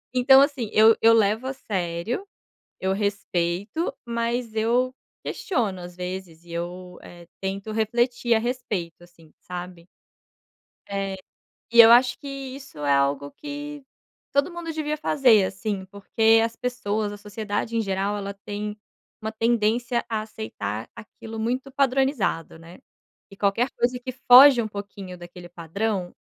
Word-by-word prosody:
Então, 265 +2 +7
assim, 275 -7 0
eu 220 +1 +6
eu 230 - +7
levo 220 +2 +2
a 265 - -2
sério, 190 - -3 0.5
eu 190 0 0
respeito, 200 - -2
mas 235 -1 -2
eu 245 +4 +2 0.3
questiono 245 - -2
às 175 0 -9
vezes 180 -2 -6
e 170 - -16
eu, 180 +1 -6
eh, 175 -1 -14
tento 195 +2 -4
refletir 235 +2 +1
a 220 - +2
respeito, 220 -9 -4
assim, 165 -3 -21
sabe. 175 -1 -8 1.0
É, 195 -1 -3 0.6
e 235 - +4
eu 225 - +8
acho 245 +1 +5
que 285 - -9
isso 275 - -8
é 145 -1 +2
algo 140 +1 +1
que 290 -1 -7 0.5
todo 280 +5 +1
mundo 340 -1 -5
devia 305 -1 -2
fazer, 250 -9 +4
assim, 195 0 -4
porque 220 +3 +2
as 230 0 -2
pessoas, 220 -4 -2
a 205 - -8
sociedade 210 +2 -4
em 230 - +2
geral 195 +1 -1
ela 200 0 -5
tem 205 +1 -6 0.4
uma 220 0 -3
tendência 235 +1 +1
a 220 -2 -1
aceitar 165 - -6
aquilo 225 0 -9
muito 255 +4 -2
padronizado, 265 - 0
né. 165 +2 -13 0.5
E 195 - -13
qualquer 205 +6 +1
coisa 250 +1 0
que 255 +1 -6
foge 255 +1 +8
um 220 - -3
pouquinho 200 -3 -8
daquele 175 0 -11
padrão, 180 +3 -3
220 Hz, 145 wpm, -24 LUFS, 190-245 Hz, 1.0 s, eu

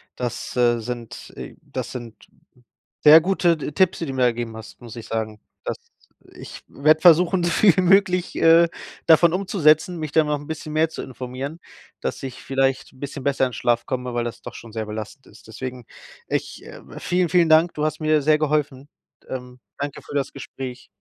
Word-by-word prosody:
Das, 120 -2 -5
äh, 120 -1 +3
sind, 120 0 -7
äh - - -8
das - - -6
sind 120 -3 -9 0.8
sehr 155 +2 +9
gute 175 -1 +2
T 150 - -5
Tipps, 185 +4 +2
die 165 - -3
du 135 - -5
mir 130 - -2
da - - +6
gegeben 115 -1 -5
hast, 110 - -12
muss 120 -1 -10
ich 115 - -9
sagen. 110 -1 -4 0.2
Das - - -3 0.6
ich - - -11
werde 155 +2 +3
versuchen, 175 +2 +5
so - - +1
viel 180 +1 +4
wie - - +4
möglich, 185 -1 +3
äh, 165 +1 +6 0.4
davon 165 +1 +6
umzusetzen, 175 -2 +2
mich 155 -2 -5
da 160 +1 +4
noch 150 0 0
'n 145 0 -11
bisschen 155 -1 -6
mehr 155 +1 +2
zu - - -7
informieren, 130 +4 -7 0.4
dass - - -4
ich 130 -2 -7
vielleicht 135 0 0
'n 130 - -21
bisschen 140 0 -6
besser 135 -1 +1
in 125 - -9
Schlaf 120 0 0
komme, 125 -1 -4
weil 120 0 -1
das 120 - -6
doch - - -9
schon 115 -2 -11
sehr 110 -1 -3
belastend 110 +5 -8
ist. 105 - -18
Deswegen 125 +2 -7 0.4
ich, - - -3
äh - - -11 0.2
vielen 180 -1 0
vielen 170 0 +4
Dank. 160 +2 +5
Du 150 - -2
hast 155 +1 -3
mir 155 -1 +2
sehr 155 +2 +3
geholfen. 145 -2 -1 0.4
Ähm, 125 -1 -7 0.2
Danke 145 0 -5
für - - -12
das 140 -1 -2
Gespräch. 130 -2 -8
145 Hz, 200 wpm, -22 LUFS, 125-160 Hz, 0.8 s, sehr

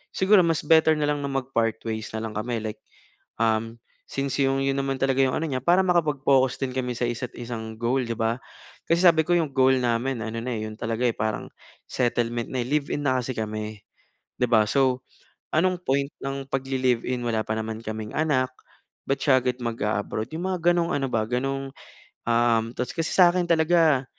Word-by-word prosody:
Siguro 195 +2 +5
mas 165 -2 0
better 160 +1 +5
na 150 - -1
lang 145 0 0
na 140 - -3
mag-partways 115 -5 -2
na 110 - -3
lang 110 - -4
kami 110 +1 -3
like, 110 -1 -5 0.6
um, 115 0 +1 0.4
since 135 0 -2
'yong 135 0 +2
'yon 135 0 +1
naman 135 -1 -2
talaga 135 0 +1
'yong 130 - +1
ano 165 - -1
niya. 130 -4 -2
Para 180 +5 +4
makapag-focus 140 -7 +2
din 130 - -2
kami 125 -2 -2
sa 120 - -3
isa't-isang 120 -2 -5
goal 125 +3 +1
'di 115 -1 -3
ba? 115 +1 -1 0.5
Kasi 170 +2 +2
sabi 165 -3 +6
ko 175 - +3
'yong 160 -4 +1
goal 130 0 +5
namin 120 +1 0
ano 110 +1 -4
na 125 - -3
'yon 110 0 -5
talaga 115 +1 0
parang 110 -1 -2 0.4
settlement 120 -1 -1
na. 130 -2 -1
Live-in 145 +2 -1
na 130 -2 +2
kasi 125 +1 -3
kami 110 -1 -4 0.6
'di 125 - +1
ba? 110 -3 +5
So 130 -1 +1 0.5
anong 180 +2 +1
point 140 0 0
ng 135 0 -4
pagli-live-in 130 -2 0
wala 110 -2 0
pa 110 - -1
naman 110 0 -4
kaming 110 -1 -5
anak. 135 -5 +1 0.6
Ba't 135 - 0
siya 130 -3 +5
agad 125 0 -1
mag-a-abroad. 110 -2 -2
'Yong 165 +3 -4
mga 185 -1 -1
gano'ng 170 0 0
ano 135 -1 0
ba 110 - +1
gano'n, 135 +3 -2 0.6
um, 115 -1 +3
tapos 125 -1 -3
kasi 165 -1 -1
sa 180 -2 +7
akin 180 0 +1
talaga 160 -4 +3
130 Hz, 185 wpm, -25 LUFS, 115-145 Hz, 0.6 s, sa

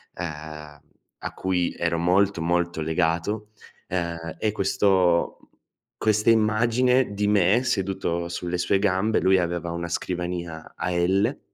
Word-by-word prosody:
uhm, 75 -3 -7 0.4
a - - -6
cui 90 -2 -1
ero 85 0 0
molto, 90 +2 +2
molto 85 0 0
legato, 85 +6 -1 0.4
uhm, 85 -2 -3
è 110 - 0
questo 95 -4 +2
mhmm, - - -23 0.5
questa 110 +1 +2
immagine 115 +3 +3
di 105 0 0
me 105 +3 +3
seduto 95 -7 -1
sulle 90 +1 -3
sue 100 +2 +2
gambe, 100 +2 +1
lui 95 0 +4
aveva 85 -1 -2
una 85 0 -4
scrivania 85 -2 -4
a 90 +2 -2
L 95 +8 +1
90 Hz, 130 wpm, -24 LUFS, 85-105 Hz, 0.5 s, lui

